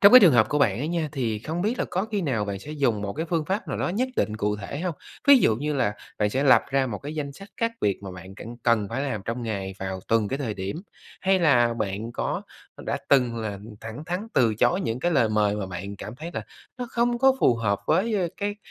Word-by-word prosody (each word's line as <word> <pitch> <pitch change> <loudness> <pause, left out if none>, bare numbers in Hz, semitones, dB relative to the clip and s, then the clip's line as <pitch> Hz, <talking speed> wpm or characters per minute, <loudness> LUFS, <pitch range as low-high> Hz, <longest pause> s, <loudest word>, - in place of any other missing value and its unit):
trong 200 +3 +8
cái 255 - +12
trường 180 -7 +7
hợp 120 -3 +5
của 150 - +1
bạn 115 -7 +3
ấy 145 +5 -2
nha, 165 -3 -1
thì 115 -6 -1
không 160 - -3
biết 225 +4 0
là - - +1
có 185 +3 0
khi 205 - +1
nào 120 -9 0
bạn 100 -1 -4
sẽ 150 - -10
dùng 135 -9 0
một 100 -1 -3
cái 160 +2 -3
phương 165 -2 0
pháp 195 +6 -2
nào - - -2
đó - - 0
nhất 235 +9 0
định 105 0 0
cụ 105 -1 0
thể 105 +8 -6
hông? 175 -2 -2 0.3
Ví 280 -1 +10
dụ 110 - +3
như 150 +4 -2
là 105 -6 +1 0.2
bạn 105 0 +2
sẽ 135 +6 0
lập 135 - +7
ra 135 0 +2
một 105 -5 -4
cái 145 +2 -7
danh 145 -2 -3
sách 195 +8 -12
các 230 0 0
việc 100 -2 +1
mà 95 - -6
bạn 95 +1 -10
c - - -16 0.2
cần 115 -4 +3
phải 130 +6 -2
làm 130 -7 -2
trong 115 +2 -3
ngày 100 -4 -3
vào 95 -1 -4
từng 115 -2 +2
cái 135 - -2
thời 120 -7 -2
điểm? 95 +6 -4 0.4
Hay 190 0 +3
là 120 -9 +4
bạn 110 +2 -3
có - - -2 0.4
đã - - 0
từng 125 -4 +4
là 105 -3 -3 0.2
thẳng 115 +7 -7
thắn 180 +5 -3
từ 115 -4 +4
chối 175 - +2
những 120 -9 -2
cái 175 - +1
lời 130 -8 +3
mời 105 -1 +2
mà 100 -2 -3
bạn 95 +2 -6
cảm 105 +4 -7
thấy 160 +5 -6
là - - -2 0.4
nó 245 - -3
không 240 0 +1
có 265 +1 +5
phù 120 - +5
hợp 100 -3 0
với, 220 +4 +2
ơ, 185 -4 +1
cái 205 0 -2
125 Hz, 270 wpm, -25 LUFS, 105-170 Hz, 0.4 s, cái